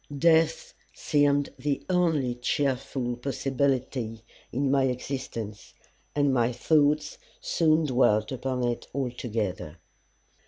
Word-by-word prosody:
Death 160 +1 +3 0.2
seemed 145 -1 +2
the 145 -1 -2
only 165 -9 +1
cheerful 125 -1 -1
possibility 130 -3 -1 0.3
in 135 +1 0
my 135 -1 +3
existence, 125 -5 -5 0.4
and 145 -2 +2
my 120 -1 +2
thoughts 150 +4 +2 0.2
soon 160 -1 +2
dwelt 110 -5 +2
upon 130 0 -2
it 120 -1 -2
altogether. 110 - -3
130 Hz, 95 wpm, -27 LUFS, 120-145 Hz, 0.4 s, Death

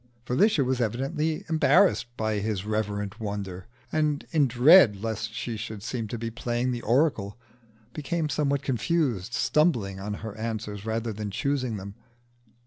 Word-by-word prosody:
Felicia 150 - +3
was 130 0 0
evidently 135 +7 -1
embarrassed 165 0 +4
by 110 -1 0
his 105 -2 -2
reverent 105 0 -2
wonder, 100 -3 -5 0.2
and, 150 -2 0
in 150 -4 +3
dread 130 - +7
lest 110 -2 -3
she 120 - -4
should 110 -2 -6
seem 120 -2 -3
to 120 - -5
be 115 0 -4
playing 120 +2 -1
the 120 -1 -3
oracle, 115 -5 +1 0.6
became 155 +2 -2
somewhat 140 -1 0
confused, 125 - 0
stumbling 125 - +1
on 105 +1 -4
her 105 -2 -6
answers 110 -2 -4
rather 115 0 -2
than 105 0 -4
choosing 130 0 -1
them. 100 +1 -8
115 Hz, 145 wpm, -27 LUFS, 105-140 Hz, 0.6 s, dread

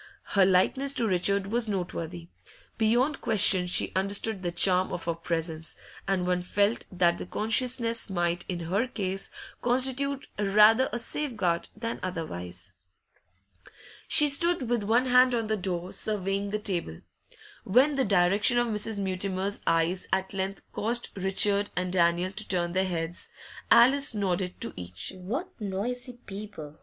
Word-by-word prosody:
Her 195 -2 +5
likeness 265 +9 +2
to 230 - +2
Richard 195 +1 +1
was 225 +2 0
noteworthy; 175 -3 -5 0.5
beyond 240 +6 +1
question 195 -4 +5
she 175 - +2
understood 200 +2 +1
the 175 -2 -2
charm 180 +1 +2
of 175 - -5
her 170 - 0
presence, 165 -1 -4 0.3
and 190 -2 0
one 180 0 0
felt 205 +5 0
that 175 -2 +1
the - - -6
consciousness 230 +2 +1
might, 175 -2 -1
in 175 -2 -3
her 195 +9 -1
case, 195 -4 -4 0.3
constitute 265 +3 +3
rather 210 +5 +4
a - - -2
safeguard 225 - -2
than 230 +2 -5
otherwise. 95 - -6 1.3
She 300 -1 +8
stood 315 -1 +3
with 240 -1 0
one 230 +5 +1
hand 250 0 +4
on 230 -1 -1
the 215 0 -1
door, 180 -2 -4
surveying 200 -1 -2
the 210 - -2
table. 180 - -4 0.6
When 255 +9 +3
the 275 -1 +1
direction 200 +4 +2
of 240 -1 +1
Mrs. 210 0 -1
Mutimer's 190 0 -2
eyes 165 +3 0
at 190 0 -1
length 195 0 -4
caused 235 +3 -1
Richard 200 +1 +1
and 180 0 -2
Daniel 175 +1 +1
to 215 +2 -7
turn 175 -2 -1
their 190 +2 0
heads, 170 -1 -4 0.4
Alice 265 +1 +5
nodded 185 -2 -2
to - - -2
each. 90 - -6
'What 235 - -5
noisy 240 +6 -4
people! 195 -9 -10
195 Hz, 150 wpm, -27 LUFS, 180-230 Hz, 1.3 s, She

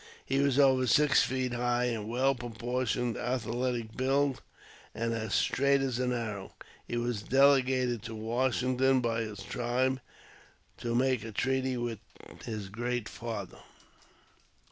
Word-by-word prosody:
He 135 +1 0
was 140 -2 +2
over 130 -2 +4
six 150 +2 +5
feet 130 -1 -1
high 120 0 +1
and 115 -3 -2
well 130 +3 +2
pro 120 -1 -7
portioned, 120 +1 -1
athletic 120 -2 -2
build, 135 +1 +1 0.5
and 115 0 -1
as 110 -2 -2
straight 140 0 +3
as 130 -3 -1
an 125 -1 0
arrow. 105 -5 -4 0.3
He 120 - -2
was 120 -3 -1
delegated 130 -2 +3
to 115 -1 -6
Washington 130 +3 +1
by 115 -1 0
his 105 -3 -6
tribe 125 +4 -1 0.8
to 120 0 -2
make 130 -2 +2
a 110 - -6
treaty 130 +3 0
with 120 -3 -3 0.5
his 105 -4 -5
Great 120 +2 -2
Father. 110 -5 -6
125 Hz, 140 wpm, -30 LUFS, 115-130 Hz, 0.8 s, six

